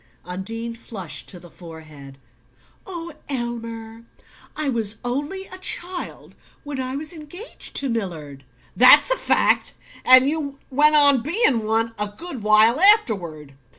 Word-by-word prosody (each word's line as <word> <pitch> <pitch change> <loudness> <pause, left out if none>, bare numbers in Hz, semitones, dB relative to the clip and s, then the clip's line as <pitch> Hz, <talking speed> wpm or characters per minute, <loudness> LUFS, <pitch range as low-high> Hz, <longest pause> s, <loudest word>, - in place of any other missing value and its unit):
Undine 225 +6 -6
flushed 190 -10 -8
to 180 - -9
the 175 -1 -16
forehead. 155 -5 -13 0.7
"Oh, 340 -3 -8 0.2
Elmer 230 -3 -6 0.5
I 305 -1 -3
was 225 -5 -2
only 290 +10 -4
a 370 -1 -11
child 360 -1 -4 0.3
when 290 -3 -6
I 255 +1 -5
was 305 +4 -4
engaged 335 +8 -11
to 275 - 0
Millard 165 - -6 0.2
" - - -33
"That's 375 - +7
a - - +4
fact. - - +1 0.3
And 255 +1 +6
you 285 -2 -4
went 300 +3 +4
on 285 -4 +6
being 280 - +1
one 225 +1 0
a 210 0 0
good 335 -9 -8
while 215 +5 +4
afterward. 195 - +3
235 Hz, 140 wpm, -21 LUFS, 205-300 Hz, 0.7 s, That's